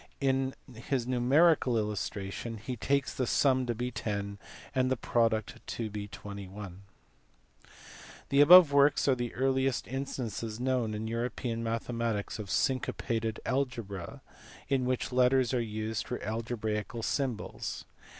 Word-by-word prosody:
In 135 -1 +1 0.2
his 125 +1 -2
numerical 130 +1 +4
illustration 105 +1 -3
he 120 +4 -5
takes 140 +4 0
the 130 - -1
sum 130 -1 +3
to 120 - -1
be 125 +2 -3
10 100 -3 -3 0.3
and 130 -1 +2
the 130 - +1
product 115 -2 0
21. 100 -3 -6 1.5
The 140 +1 +5
above 170 +1 +9
works 140 0 +4
are 135 - +5
the 120 -2 -3
earliest 130 0 +1
instances 120 -4 -4
known 125 -4 0
in 110 +1 -4
European 115 0 -2
mathematics 115 -2 -2
of 105 -2 -6
syncopated 115 -3 -1
algebra 115 -9 -3 0.5
in 135 -2 +2
which 130 0 -1
letters 125 0 +3
are 125 - +2
used 110 -1 -3
for 125 - -3
algebraical 110 0 -3
symbols. 130 -3 -3
120 Hz, 120 wpm, -30 LUFS, 110-130 Hz, 1.5 s, above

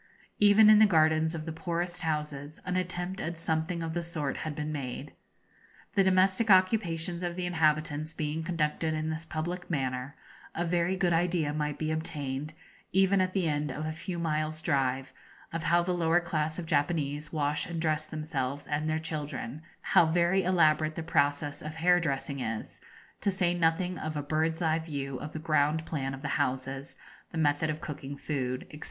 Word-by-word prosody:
Even 210 +1 +7
in 215 - +8
the 215 - +8
gardens 160 -2 +3
of 155 -1 -5
the 160 - -4
poorest 175 +2 -2
houses 150 -2 -3
an 180 0 -1
attempt 185 +1 -2
at 170 0 -3
something 165 +1 -1
of 165 0 -3
the 175 - -1
sort 155 -5 -3
had 155 -2 -4
been 150 +1 -3
made. 135 -5 -5 0.8
The 195 - +4
domestic 190 +3 +3
occupations 185 -3 +3
of 175 -1 -2
the 180 0 -2
inhabitants 155 -2 +1
being 155 +1 -2
conducted 160 -1 -1
in 155 0 -2
this 160 +1 -4
public 175 +3 -4
manner, 130 -2 -2 0.4
a 175 - 0
very 175 +1 +1
good 180 -2 +2
idea 165 -3 +1
might 150 -1 -2
be 155 0 -1
obtained, 150 -2 -3 0.4
even 190 +1 +4
at 185 0 0
the 185 -4 +1
end 150 -1 0
of 155 - -4
a 155 - -2
few 175 +3 -5
miles' 155 -1 -1
drive, 135 -3 0 0.4
of 165 -1 -3
how 175 +1 +4
the 180 +1 0
lower 170 0 +3
class 155 -3 -2
of 175 - -4
Japanese 150 -2 0
wash 150 -2 0
and 170 -1 -4
dress 155 -1 0
themselves 145 -3 -3
and 150 +1 -1
their 155 - +1
children, 150 -3 -4 0.2
how 165 - +4
very 175 +3 +3
elaborate 155 -4 +3
the 165 - -4
process 145 -1 +1
of 155 +1 -6
hair 175 +2 +4
dressing 140 -3 -2
is, 115 -3 -4 0.4
to - - +2
say 185 -2 +1
nothing 175 +1 +1
of 155 -1 -3
a 145 - -2
bird's 160 +3 0
eye 160 0 +2
view 140 -5 -4
of 150 - -7
the - - -4
ground 155 0 +1
plan 135 -3 -3
of 135 - -12
the - - -1
houses, 135 0 -3 0.3
the - - -5
method 150 0 +2
of 155 +1 -3
cooking 140 -2 -6
food, 130 -4 -3
&c. 150 - -10
160 Hz, 185 wpm, -29 LUFS, 150-175 Hz, 0.8 s, in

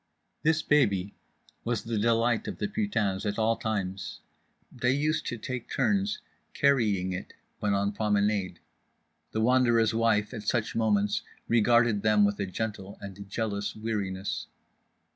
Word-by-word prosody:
This 160 0 +2
baby 100 -10 +2 0.5
was 115 -2 -1
the 115 -2 -2
delight 115 +1 +2
of - - -4
the - - -1
putains 195 - -1
at 105 -1 -2
all 115 +1 +2
times. 100 -5 -3 0.5
They 125 +1 +1
used 155 +2 0
to 120 - -3
take 125 +1 -5
turns 205 0 +1 0.4
carrying 105 - +2
it 90 - -6 0.3
when 105 -1 +1
on 100 +1 +1
promenade. 100 -3 0 0.7
The 110 - -1
Wanderer's 120 -2 +4
wife, 110 -1 +2
at 110 - -5
such 110 -1 0
moments, 105 -2 +2 0.3
regarded 115 -1 +4
them 105 -1 +4
with 100 0 0
a 100 - -1
gentle 100 0 -4
and 100 0 -9
jealous 105 -1 -2
weariness. 100 -4 -3
110 Hz, 140 wpm, -28 LUFS, 100-120 Hz, 0.7 s, Wanderer's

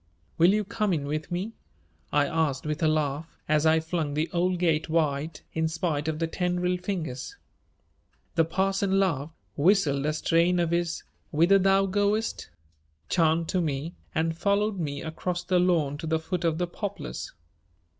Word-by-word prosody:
"Will 170 +3 +7
you 210 +1 +2
come 205 0 -1
in 145 -4 -1
with 155 +2 -3
me?" 185 +6 -3 0.6
I 145 -1 +3
asked 150 -3 0
with 150 +2 -2
a 160 - +4
laugh, 155 0 -1
as 155 +1 +3
I 160 0 +5
flung 160 -2 -2
the 155 +2 -1
old 180 +1 +1
gate 165 -3 +1
wide 155 -1 0
in 160 0 +1
spite 160 -2 -2
of 160 -1 -1
the 165 - 0
tendril 180 +1 0
fingers. 180 - -4 1.0
The 165 - +4
parson 195 +3 +1
laughed, 160 -5 0 0.2
whistled 150 -4 +3
a 155 - +1
strain 170 +3 +2
of 170 -1 +1
his 170 -1 -1 0.3
"whither 170 +6 +4
thou 195 +1 +4
goest" 205 +3 0 0.6
chant 165 -1 +2
to 185 - +1
me 155 +1 -2 0.2
and 165 +1 +1
followed 200 +2 +1
me 145 -4 -3
across 175 +2 -3
the 180 -1 +2
lawn 160 -5 +2
to 160 - -5
the 160 0 +2
foot 175 +2 -3
of 160 -1 +1
the 175 - 0
poplars. 200 0 -5
165 Hz, 165 wpm, -27 LUFS, 155-185 Hz, 1.0 s, Will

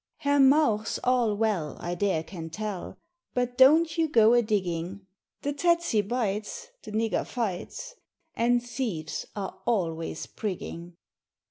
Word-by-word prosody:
Herr 285 0 +2
Mauch's 265 -6 +4
all 245 -4 +2
well 205 -9 0
I 175 - -3
dare 175 -3 0
can 165 -2 -8
tell 205 +2 -5 0.4
But 245 0 0
don't 310 +5 +5
you 325 - +3
go 230 -4 +6
a 240 - +5
digging; 190 -3 -2 0.4
The 285 - -1
tetse 340 -7 +2
bites, 220 - -3
the - - -10
nigger 220 +1 0
fights, 235 - -4 0.4
And 240 +1 +2
thieves 225 - -4
are 195 -2 -5
always 165 -8 -1
prigging. 175 -4 -6
220 Hz, 130 wpm, -27 LUFS, 185-255 Hz, 0.4 s, go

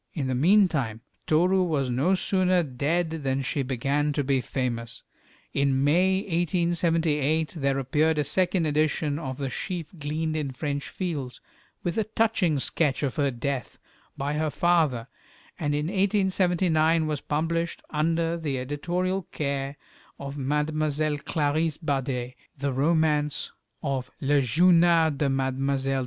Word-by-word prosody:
In 145 -5 -1
the 130 - -1
meantime 150 - +3 0.3
Toru 180 +5 +3
was 145 -8 0
no 145 +10 +2
sooner 185 -1 +2
dead 160 +5 -1
than 135 0 0
she 140 +2 -1
began 135 +3 0
to 145 - 0
be 135 -1 +1
famous. 120 -3 -4 0.5
In 135 -1 +2
May, 185 +6 +3
1878, 165 -4 +1
there 140 -2 0
appeared 150 +4 +1
a 150 - +2
second 175 +3 +1
edition 150 0 +1
of 130 -5 -5
the 135 -2 -3
"Sheaf 175 -1 -4
gleaned 155 +2 -2
in 145 -4 -2
French 140 +1 -3
Fields," 150 -9 -4 0.4
with 175 +5 -1
a - - +2
touching 210 -7 +1
sketch 140 +1 0
of 135 -3 -2
her 140 -2 +2
death, 130 +1 -4 0.4
by 140 +2 -2
her 155 +1 0
father; 155 -8 +1 0.5
and 145 -3 0
in 150 +1 -1
1879 180 -4 +2
was 150 -2 -2
published, 165 +3 -2
under 165 +2 0
the 150 -5 -2
editorial 175 +8 -2
care 140 -1 -3 0.4
of 140 0 -6
Mlle. 150 +1 0
Clarisse 155 0 0
Bader, 135 -5 -2 0.3
the 140 0 -2
romance 150 0 +1 0.3
of 135 -3 -2
"Le 145 +1 +2
Journal 170 +4 +4
de 140 0 0
Mlle. 135 0 0
150 Hz, 135 wpm, -26 LUFS, 135-170 Hz, 0.5 s, Journal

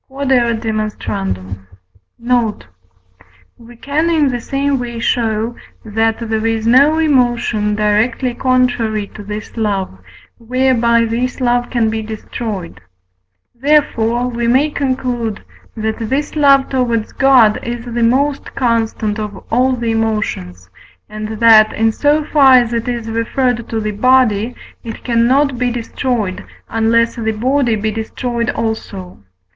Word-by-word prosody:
Q.E.D. 245 -5 0 1.5
Note. 235 -3 -1 0.9
We 240 +1 -14
can 290 +7 -1
in 310 -4 +2
the 245 -2 -3
same 275 +2 -1
way 240 -1 -5
show, 230 0 -1 0.3
that 225 +1 0
there 220 0 -1
is 225 -1 -1
no 275 +7 +5
emotion 240 -8 +1
directly 215 +4 +1
contrary 245 -4 0
to 215 - -9
this 210 +1 -7
love, 200 - -1 0.4
whereby 235 -1 +2
this 240 +3 -2
love 245 -1 +1
can 230 -3 +1
be 220 0 -2
destroyed; 215 - -6 0.7
therefore 245 -3 +1
we 235 -1 -2
may 270 +5 +3
conclude, 250 -6 -2 0.3
that 220 0 -2
this 270 +8 -2
love 275 -2 +4
towards 235 -4 -1
God 255 -6 +4
is 235 0 -5
the 240 -1 -3
most 270 +5 0
constant 225 -3 -1
of 205 -3 -6
all 255 +3 +2
the 235 -2 -2
emotions, 210 - -2 0.4
and 215 0 -6
that, 220 -2 +6
in 225 +1 +2
so 295 +6 +1
far 275 -4 +5
as 240 -2 +4
it 230 0 -2
is 240 -2 -3
referred 230 +1 -1
to 225 - -2
the 215 -1 -2
body, 240 0 +2 0.3
it 225 -2 -8
cannot 255 +3 +2
be 250 -1 +1
destroyed, 235 -4 -3 0.3
unless 230 +1 +1
the 220 -1 -1
body 245 +1 +1
be 215 +1 -2
destroyed 235 +2 -3
also. 100 - -4
235 Hz, 130 wpm, -16 LUFS, 220-255 Hz, 1.5 s, that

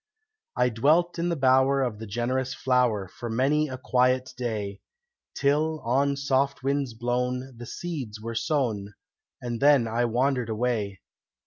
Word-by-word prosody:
I 125 - +3
dwelt 155 +10 +2
in 170 +1 0
the 170 - 0
bower 135 0 +3
of 115 -5 -3
the 110 - -7
generous 125 +5 -1
flower 125 -7 +1
For 120 +6 -7
many 140 +6 +2
a 130 -2 -6
quiet 130 0 +1
day, 105 -5 -4 0.5
Till, 155 +3 +1
on 140 +4 +1
soft 140 -1 0
winds 135 -3 -1
blown, 125 +2 -2
the 120 0 -9
seeds 140 - -5
were 115 +2 -5
sown; 110 - -1 0.5
And 120 -1 -3
then 140 -4 +5
I 115 +2 0
wandered 125 0 0
away. 110 -4 -1
125 Hz, 145 wpm, -26 LUFS, 115-140 Hz, 0.5 s, then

